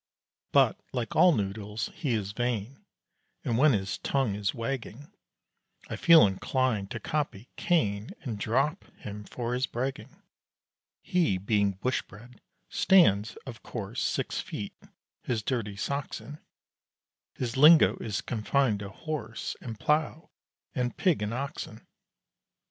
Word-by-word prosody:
But, -, -, +4 dB
like 120 Hz, -4 st, -3 dB
all 180 Hz, +2 st, +7 dB
noodles, 105 Hz, -2 st, -2 dB
he 145 Hz, -9 st, -2 dB
is 100 Hz, -3 st, -1 dB
vain; 120 Hz, +2 st, -3 dB, 0.6 s
And 115 Hz, -, +1 dB
when 140 Hz, +4 st, +5 dB
his 100 Hz, -2 st, -2 dB
tongue 135 Hz, -7 st, 0 dB
is 100 Hz, -1 st, -1 dB
wagging, 130 Hz, +2 st, -5 dB, 0.8 s
I -, -, -1 dB
feel 165 Hz, -2 st, +7 dB
inclined 105 Hz, +1 st, 0 dB
to 110 Hz, -, -5 dB
copy 130 Hz, -4 st, -3 dB
Cain, 110 Hz, -, +1 dB
And 115 Hz, -7 st, -4 dB
"drop" 135 Hz, -, 0 dB
him 105 Hz, 0 st, -8 dB
for 120 Hz, +2 st, -4 dB
his 125 Hz, +1 st, 0 dB
bragging. 130 Hz, +3 st, -4 dB, 0.8 s
He, 170 Hz, -, +2 dB
being 100 Hz, +1 st, +1 dB
Bush 120 Hz, +7 st, -1 dB
bred, 120 Hz, +4 st, -15 dB, 0.3 s
stands, 115 Hz, -, +4 dB
of 120 Hz, -4 st, -8 dB
course, 110 Hz, +1 st, -5 dB
Six -, -, -1 dB
feet -, -, -6 dB, 0.5 s
his 115 Hz, -4 st, -2 dB
dirty 110 Hz, -5 st, -2 dB
socks 140 Hz, +7 st, -3 dB
in; 150 Hz, +1 st, -10 dB, 1.0 s
His 125 Hz, -1 st, -3 dB
lingo 155 Hz, +4 st, +7 dB
is 105 Hz, -6 st, -3 dB
confined 115 Hz, 0 st, +1 dB
to 100 Hz, -1 st, -6 dB
horse 120 Hz, -4 st, -5 dB
And 115 Hz, -4 st, -7 dB
plough, 155 Hz, +2 st, 0 dB, 0.4 s
and 125 Hz, -4 st, -2 dB
pig 175 Hz, -, +2 dB
and 105 Hz, +1 st, -1 dB
oxen. 135 Hz, +4 st, -5 dB
120 Hz, 130 wpm, -28 LUFS, 105-140 Hz, 1.0 s, all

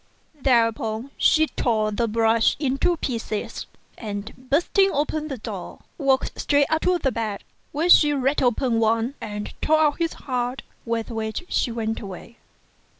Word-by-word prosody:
Thereupon, 230 Hz, -1 st, +1 dB
she 315 Hz, 0 st, +4 dB
tore 220 Hz, -7 st, 0 dB
the 230 Hz, +3 st, 0 dB
brush 225 Hz, 0 st, +3 dB
to 280 Hz, +5 st, 0 dB
pieces, 230 Hz, -6 st, -4 dB, 0.3 s
and 205 Hz, -1 st, -5 dB, 0.2 s
bursting 370 Hz, +6 st, +3 dB
open 305 Hz, +1 st, -1 dB
the 275 Hz, -4 st, -5 dB
door, 215 Hz, -, -7 dB, 0.2 s
walked 270 Hz, -2 st, +1 dB
straight 285 Hz, -1 st, +3 dB
up 315 Hz, 0 st, +2 dB
to 365 Hz, 0 st, +2 dB
the 270 Hz, -6 st, 0 dB
bed, 215 Hz, -3 st, -3 dB, 0.3 s
where 310 Hz, +4 st, 0 dB
she 300 Hz, -4 st, +7 dB
ripped 275 Hz, 0 st, +1 dB
open 245 Hz, -1 st, +1 dB
Wang 225 Hz, +3 st, +1 dB
and 210 Hz, -1 st, -5 dB
tore 315 Hz, 0 st, +3 dB
out 300 Hz, 0 st, +2 dB
his 335 Hz, -1 st, 0 dB
heart, 250 Hz, -1 st, -3 dB, 0.2 s
with 230 Hz, 0 st, -2 dB
which 220 Hz, +6 st, -3 dB
she 245 Hz, -, 0 dB
went 225 Hz, -1 st, -2 dB
away. 200 Hz, +3 st, -9 dB
245 Hz, 150 wpm, -23 LUFS, 225-290 Hz, 0.3 s, she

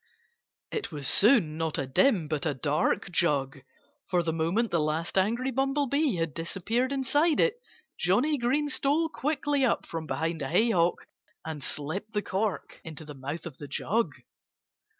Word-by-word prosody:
It 435 Hz, -, -3 dB
was 145 Hz, -4 st, -4 dB
soon 200 Hz, -, +4 dB
not 160 Hz, -1 st, -1 dB
a 135 Hz, -, -1 dB
dim 170 Hz, -, +3 dB
but 155 Hz, +1 st, -1 dB
a 145 Hz, -, -1 dB
dark 150 Hz, +7 st, 0 dB
jug. 140 Hz, -6 st, +1 dB, 0.5 s
For 175 Hz, -2 st, +2 dB
the 160 Hz, -1 st, -1 dB
moment 170 Hz, +9 st, 0 dB
the 170 Hz, -, +2 dB
last 155 Hz, +2 st, -1 dB
angry 230 Hz, +7 st, +1 dB
Bumblebee 275 Hz, 0 st, +1 dB
had 165 Hz, -3 st, -2 dB
disappeared 200 Hz, -, -1 dB
inside 290 Hz, +4 st, +2 dB
it 485 Hz, 0 st, +2 dB, 0.4 s
Johnnie 250 Hz, +12 st, +2 dB
Green 270 Hz, +5 st, +1 dB
stole 290 Hz, +3 st, +1 dB
quickly 290 Hz, -2 st, 0 dB
up 255 Hz, -, +1 dB
from 165 Hz, -1 st, -5 dB
behind 160 Hz, 0 st, -2 dB
a 135 Hz, -, -3 dB
haycock 180 Hz, -2 st, +2 dB, 0.4 s
and 160 Hz, -2 st, -5 dB
slipped 170 Hz, +12 st, -5 dB
the 210 Hz, -1 st, 0 dB
cork 195 Hz, +1 st, -2 dB
into 160 Hz, -1 st, -8 dB
the 150 Hz, -, -8 dB
mouth 145 Hz, +4 st, -6 dB
of 160 Hz, -6 st, -8 dB
the 145 Hz, -, -7 dB
jug. 190 Hz, +4 st, 0 dB
180 Hz, 160 wpm, -28 LUFS, 160-265 Hz, 0.5 s, soon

